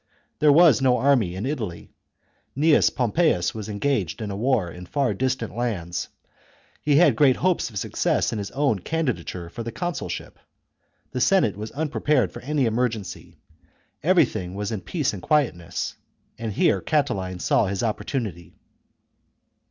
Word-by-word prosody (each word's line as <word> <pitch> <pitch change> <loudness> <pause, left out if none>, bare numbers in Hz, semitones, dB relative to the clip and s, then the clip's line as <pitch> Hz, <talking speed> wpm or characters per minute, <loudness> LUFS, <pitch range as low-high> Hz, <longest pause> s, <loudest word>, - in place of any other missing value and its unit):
There 150 -1 +5
was 155 -5 +6
no 125 -2 +4
army 125 -11 +2
in 95 +5 -4
Italy; 115 - -5 0.6
Gnaeus 155 +1 +5
Pompeius 125 - +1
was 110 -1 -6
engaged 100 - -1
in 105 -2 -4
a - - -4
war 110 -5 +1
in 90 +1 -10
far 140 +1 0
distant 130 -4 -2
lands; 95 -8 -2 0.7
he 145 -1 +2
had 170 +4 +5
great 140 -4 +5
hopes 180 -6 0
of 105 - -8
success - - 0
in 110 - -3
his 100 - -4
own 135 -7 0
candidature 95 - -3
for 85 - -8
the 115 0 -4
consulship; 175 +5 -5 0.7
the 125 - -3
Senate 170 - +3
was 105 +2 -6
unprepared 150 -5 +1
for 120 - -9
any 145 0 0
emergency; 115 -4 -2 0.6
everything 90 0 +2
was 105 +1 -3
in 110 -4 -3
peace 150 - -1
and 95 - -7
quietness, 115 - 0 0.5
and 115 -3 -3
here 95 - +2
Catiline 95 - -1
saw 100 - +2
his 95 +2 -2
opportunity. 105 - -3
115 Hz, 150 wpm, -24 LUFS, 95-140 Hz, 0.7 s, was